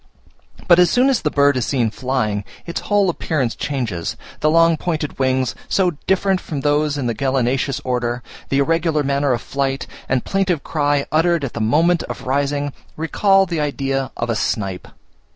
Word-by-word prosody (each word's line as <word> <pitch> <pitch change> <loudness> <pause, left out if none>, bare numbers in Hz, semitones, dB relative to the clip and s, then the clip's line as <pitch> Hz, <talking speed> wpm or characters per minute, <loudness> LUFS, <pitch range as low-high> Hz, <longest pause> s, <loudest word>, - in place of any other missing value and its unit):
But 175 -1 +7
as 180 - +6
soon 255 +2 +3
as 255 - +1
the 150 - +1
bird 140 -2 +3
is 125 - -1
seen 120 -6 +1
flying, 115 -5 -1 0.2
its 170 - -4
whole 205 -2 +2
appearance 155 -8 -1
changes; 115 - -3 0.2
the 155 - +2
long 165 +1 +5
pointed 155 -3 -3
wings, 130 -1 +1 0.2
so 185 -2 +2 0.2
different 190 0 +2
from 145 -3 -5
those 145 +1 +1
in 135 - -2
the 120 - 0
gallinaceous 135 +1 0
order, 120 -1 -2 0.3
the 135 - +1
irregular 160 +1 +1
manner 140 0 +1
of 120 - -1
flight, 135 -1 -2 0.2
and 130 -2 0
plaintive 185 -6 0
cry 145 -2 0
uttered 165 0 +2
at 135 - -3
the 115 - -3
moment 160 +10 +3
of - - -7
rising, 140 +1 0 0.2
recall 195 +5 +3
the 170 -3 -3
idea 135 -2 -1
of 120 0 -1
a - - 0
snipe. 95 -4 -2
140 Hz, 175 wpm, -20 LUFS, 130-165 Hz, 0.3 s, But